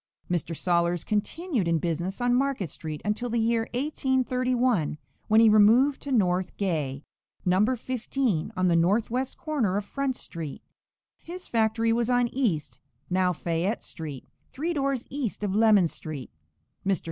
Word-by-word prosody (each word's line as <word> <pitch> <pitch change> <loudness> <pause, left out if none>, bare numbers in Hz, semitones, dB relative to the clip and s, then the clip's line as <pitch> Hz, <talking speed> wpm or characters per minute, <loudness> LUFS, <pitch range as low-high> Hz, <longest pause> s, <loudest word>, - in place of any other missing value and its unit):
Mr. 170 -2 -1
Sollers 170 -1 +1
continued 225 - -1
in 165 -1 +2
business 170 - -2
on 245 0 +2
Market 255 - 0
street 155 -2 -6
until 215 +4 -1
the 235 - -1
year 225 0 +1
1831, 255 - +1 0.3
when 220 +1 +5
he 225 - +7
removed 225 +7 +5
to 285 - -6
North 185 -6 +1
Gay, 150 -8 -2 0.4
No. 185 +2 +4
15, 240 - -2
on 185 0 +2
the 170 - +3
northwest 225 +9 +1
corner 250 - 0
of 205 - -3
Front 275 +1 -2
street. 160 - -7 0.6
His 360 +2 -9
factory 225 0 +2
was 235 0 0
on 245 -1 +3
East, 210 - -1 0.3
now 185 0 +3
Fayette 175 +5 -2
street, 150 -5 -7 0.2
three 325 +5 -2
doors 275 -4 -1
east 255 -7 -3
of 200 -2 -1
Lemon 210 -4 +5
street. 150 -5 -6 0.5
Mr. 195 -1 +1
215 Hz, 145 wpm, -27 LUFS, 175-255 Hz, 0.6 s, he